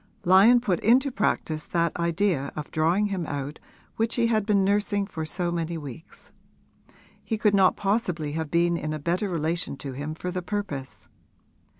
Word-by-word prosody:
Lyon 195 +7 +7
put 190 -8 0
into 260 +5 +3
practice 160 -8 -1
that 170 -1 0
idea 170 -4 0
of 150 -1 -6
drawing 175 +7 +2
him 185 -3 -2
out 145 +1 -5 0.4
which 225 +1 0
he 235 - +2
had 215 -3 +1
been 200 -2 +3
nursing 205 0 +1
for 160 -5 -5
so 175 +2 -2
many 170 0 -2
weeks: 150 +2 -10 0.9
he 220 - -2
could 210 -1 +2
not 190 -2 +4
possibly 185 -7 -1
have 160 0 -3
been 170 +1 +2
in 155 -1 -3
a - - -2
better 175 +7 -1
relation 165 -3 -1
to 135 -1 -6
him 145 +4 -5
for 180 +2 -4
the 185 0 -3
purpose. 175 -9 -5
175 Hz, 175 wpm, -26 LUFS, 155-205 Hz, 0.9 s, Lyon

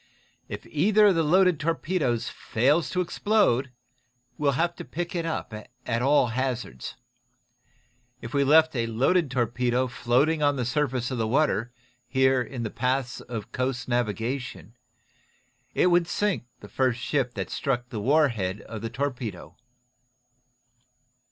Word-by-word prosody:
If - - -7
either 210 +8 +3
of 200 - +6
the 165 - +2
loaded 180 +1 +4
torpedoes 155 -6 -1
fails 140 +9 +1
to 180 - 0
explode, 170 - +1 0.6
we'll 140 0 +1
have 170 +5 0
to - - -6
pick 175 +1 -5
it 170 -2 -2
up, 160 - -4 0.3
at 115 -1 -1
all 135 -1 +4
hazards. 125 0 -3 1.2
If 115 - -8
we 140 -1 +3
left 155 +2 +5
a 115 -2 0
loaded 135 +8 +2
torpedo 125 0 0
floating 130 +6 +1
on 145 -1 +3
the 125 -3 -2
surface 130 -1 -1
of 125 - -3
the 110 - 0
water, 125 -2 +1 0.4
here 130 0 +3
in 125 -1 -5
the 110 - -3
paths 130 0 -1
of 115 -4 -7
coast 125 -1 -2
navigation, 120 - -2 1.0
it - - +3
would 175 -1 +3
sink 205 -12 -1
the 105 - -10
first 125 +3 0
ship 125 -2 -1
that - - -4
struck 125 -3 -2
the 110 -4 -4
war 145 +6 +4
head 100 -3 -3
of 110 0 -8
the 115 - -3
torpedo." 130 -4 -4
130 Hz, 145 wpm, -26 LUFS, 120-155 Hz, 1.2 s, of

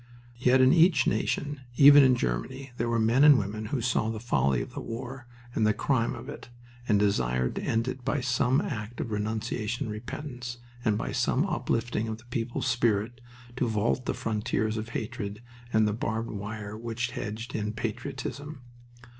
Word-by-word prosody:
Yet 130 +1 +4
in 130 +1 +6
each 170 -3 +5
nation, 145 -1 -1 0.2
even 145 0 +9
in 130 -1 +5
Germany, 120 - -3
there 120 +1 -1
were 115 - +1
men 115 +5 +4
and 150 -2 +9
women 110 0 -3
who 130 +2 -2
saw 115 -2 +1
the 110 -1 -3
folly 70 - +1
of - - -11
the - - -5
war 120 +2 -6 0.3
and 110 - +1
the 110 -1 +3
crime 120 -4 +1
of - - -9
it, 145 -4 -9 0.4
and 105 - +4
desired 65 -12 +1
to - - -1
end 115 +2 0
it 130 0 -4
by 145 - 0
some 125 +1 +2
act 110 -1 -5
of 115 - -3
renunciation 110 +2 -2
and 110 - -4
repentance, 120 +1 -6 0.3
and 105 -2 +2
by - - -3
some - - +1
uplifting 115 -1 -1
of 110 -1 -3
the 120 - -18
people's 120 +1 -2
spirit 120 -1 +1 0.4
to 125 - +1
vault 110 +3 0
the - - 0
frontiers 110 0 -1
of 110 +1 -4
hatred 105 -2 -4 0.3
and 110 -1 +4
the 105 - 0
barbed 110 +1 -2
wire 105 0 -6
which 115 +2 -3
hedged 115 +1 -5
in 105 -1 -2
patriotism. 135 +5 -5
115 Hz, 180 wpm, -28 LUFS, 110-125 Hz, 0.4 s, even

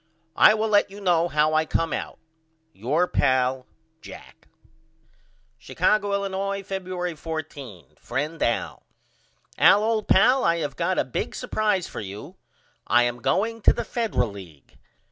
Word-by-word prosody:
I 215 - +6
will 220 0 -1
let 205 -1 +3
you 200 +1 -11
know 175 -4 +2
how 155 -1 +1
I 155 0 +3
come 165 0 -1
out. - - -5 0.6
Your 145 - 0
pal, 130 -2 0 0.3
JACK. - - -13 1.1
Chicago, 200 +8 0
Illinois, 195 0 -3
Febuery 185 -3 -4
14. 145 - -8
FRIEND 150 +6 -4
AL: 95 -9 -1 0.8
Al 205 - +6
old 220 -1 -1
pal 255 +7 +4
I 170 0 +2
have 150 -3 -4
got 180 +2 -1
a - - +1
big 130 - -4
supprise 210 -4 -1
for - - -8
you. 100 +1 -9 0.5
I 120 +1 +4
am 120 0 -2
going 225 - 0
to - - +5
the 235 - -4
Federal 215 - -1
League. 90 -8 -14
170 Hz, 145 wpm, -24 LUFS, 130-200 Hz, 1.1 s, I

